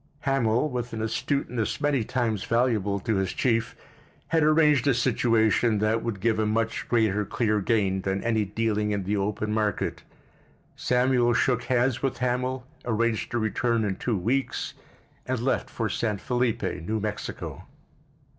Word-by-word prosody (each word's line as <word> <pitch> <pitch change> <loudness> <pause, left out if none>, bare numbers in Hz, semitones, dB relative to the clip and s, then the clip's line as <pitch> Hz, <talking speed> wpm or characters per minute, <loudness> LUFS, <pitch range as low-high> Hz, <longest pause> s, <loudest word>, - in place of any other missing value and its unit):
Hamil, 135 -1 +1
with 125 -4 -4
an 110 - -3
astuteness 115 0 -1
many 145 -5 +1
times 110 -3 -1
valuable 110 -4 +1
to 110 -1 0
his 95 -1 -1
chief, 115 -2 0 0.5
had 165 -1 +3
arranged 150 -3 +4
a 135 - +4
situation 115 -2 +2
that 110 +2 +1
would 115 -4 -3
give 110 +2 +1
a 110 - +1
much 115 +1 -1
greater 110 -3 +2
clear 105 +1 0
gain 95 -3 +1
than 95 +1 -2
any 110 -2 +1
dealing 105 +1 -1
in 100 -2 -1
the 100 +3 -1
open 105 +1 -1
market. 110 -1 -1 0.7
Samuel 125 -1 +2
shook 125 -1 +1
hands 125 0 +1
with 135 - -1
Hamil, 125 +1 -1 0.2
arranged 115 -1 0
to 120 - -2
return 115 +1 0
in 100 -2 -1
two 115 0 -1
weeks, 125 +9 -1 0.5
and 130 -1 -1
left 130 +3 0
for 115 - -2
San 105 0 -1
Felipe, 120 +2 -1
New 110 +7 -2
Mexico. 105 0 -5
115 Hz, 155 wpm, -26 LUFS, 105-125 Hz, 0.7 s, arranged